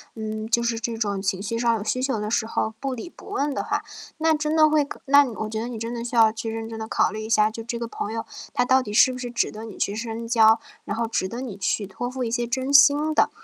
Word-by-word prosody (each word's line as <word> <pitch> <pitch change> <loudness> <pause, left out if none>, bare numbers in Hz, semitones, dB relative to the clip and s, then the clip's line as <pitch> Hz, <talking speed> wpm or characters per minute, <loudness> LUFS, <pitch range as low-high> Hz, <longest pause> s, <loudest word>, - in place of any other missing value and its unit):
嗯， 220 0 -5
就 235 +1 +3
是 235 -1 -1
这 230 0 -3
种 200 -3 -1
情 190 -1 -1
绪 215 +3 -3
上 235 0 +2
有 210 - -3
需 255 +4 -1
求 265 -5 0
的 210 0 -3
时 220 0 +1
候 220 0 -2
不 270 -1 -2
理 255 +8 -7
不 - - -16
问 295 -8 -1
的 - - -2
话， - - -2 0.3
那 320 0 +3
真 300 0 -1
的 310 -1 +5
会 305 -1 +3
可 280 - -9
那 285 +1 +7 0.2
我 - - -3
觉 220 0 -3
得 235 - -4
你 240 - -6
真 230 +2 -4
的 235 -1 -4
需 240 - -6
要 225 -1 +7
去 225 0 -4
认 225 0 -5
真 225 - -7
地 220 - -4
考 - - +2
虑 215 +1 -5
一 220 - -6
下， 215 -1 +4
就 225 +1 -7
这 235 +1 -4
个 235 - -3
朋 215 - -5
友 225 0 -4 0.3
他 245 - +2
到 260 +1 +4
底 210 - -7
是 255 +5 +5
不 250 - -6
是 245 -1 -5
值 235 - 0
得 215 +1 -8
你 220 -3 -9
去 200 - -1
深 230 0 -5
交， 225 -1 +5 0.3
然 205 - -3
后 230 0 0
值 190 -4 -1
得 235 +5 -6
你 235 -7 -6
去 200 +1 -1
托 200 +6 -5
付 255 0 -4
一 230 - -2
些 240 0 0
真 260 +3 -2
心 290 +2 +6
的。 - - +3
230 Hz, 320 characters per minute, -24 LUFS, 220-255 Hz, 0.3 s, 那